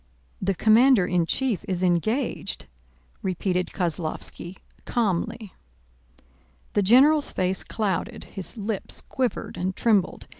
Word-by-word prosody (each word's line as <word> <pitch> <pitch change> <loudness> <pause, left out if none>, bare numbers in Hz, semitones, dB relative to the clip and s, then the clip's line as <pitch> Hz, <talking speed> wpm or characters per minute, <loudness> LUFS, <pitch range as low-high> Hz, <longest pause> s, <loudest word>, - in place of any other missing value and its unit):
"The 195 0 0
commander 225 +1 +5
in 175 -2 +1
chief 255 -3 -1
is 185 -1 -2
engaged," 185 - 0 0.6
repeated 180 -2 -1
Kozlóvski 170 +1 -3 0.3
calmly. 210 -1 -2 1.2
The 205 - +3
general's 275 +9 +5
face 185 0 -1
clouded, 200 -6 -2
his 190 +3 -3
lips 210 -1 -3
quivered 255 -2 -3
and 185 +1 -2
trembled. 210 -5 +1
195 Hz, 105 wpm, -25 LUFS, 180-230 Hz, 1.2 s, commander